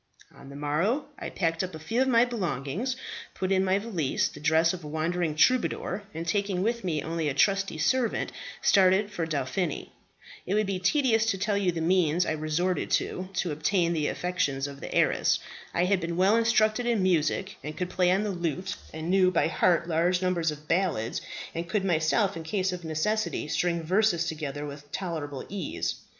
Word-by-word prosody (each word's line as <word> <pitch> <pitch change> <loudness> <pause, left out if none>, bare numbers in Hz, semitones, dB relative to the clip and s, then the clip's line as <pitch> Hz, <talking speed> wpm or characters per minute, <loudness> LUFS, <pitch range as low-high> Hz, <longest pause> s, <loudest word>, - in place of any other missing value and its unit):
"On 135 - -13
the 140 - -10
morrow 155 - 0
I - - -5
packed 165 -1 -1
up 185 -3 -5
a - - -8
few 225 +11 -1
of 265 - +3
my 240 -2 +5
belongings, 190 - -2 0.4
put 185 0 -2
in 190 0 +3
my 190 0 +2
valise 195 -10 -1
the - - -11
dress 160 +3 +3
of 180 -2 -7
a - - -7
wandering 160 +1 -1
troubadour, 215 0 +2
and 165 +1 -6
taking 195 0 0
with 235 +1 -1
me 160 -5 -1
only 165 -2 -1
a 135 - -3
trusty 195 +2 +2
servant, 235 +10 +1 0.3
started 195 +2 +4
for 170 -5 -2
Dauphiny. 155 +3 -2 0.6
It 190 - +1
would 215 0 +2
be 195 -1 -2
tedious 225 +2 +2
to 210 -3 +1
tell 205 +2 0
you 195 -3 +2
the 165 -1 -4
means 175 0 +2
I - - -1
resorted 155 +4 -1
to 185 +1 -5
to 180 -2 -1
obtain 170 +3 +1
the 155 -3 0
affections 145 -7 -1
of 140 -1 -7
the - - -7
heiress. - - +3 0.3
I 175 - +1
had 190 0 +2
been 170 0 -3
well 195 +4 +4
instructed 230 0 +2
in 230 -5 +2
music 185 +2 +1
and 150 +1 -6
could 180 0 -3
play 180 -1 +2
on 190 +3 +2
the 210 - -1
lute, 175 +1 -3
and 160 +2 -4
knew 190 -1 +5
by 175 -3 +2
heart 170 -1 +2
large 175 +2 +2
numbers 180 -3 +1
of 150 0 -7
ballads, 165 - 0 0.3
and 170 +1 -4
could 195 +1 0
myself, 175 +4 +2
in 165 - -5
case 185 +3 -1
of 180 -1 -6
necessity, 165 +6 -1
string 170 +1 0
verses 185 0 +2
together 150 -3 -4
with 145 0 -9
tolerable 155 -7 -4
ease. 190 -5 -3
180 Hz, 195 wpm, -27 LUFS, 160-195 Hz, 0.6 s, my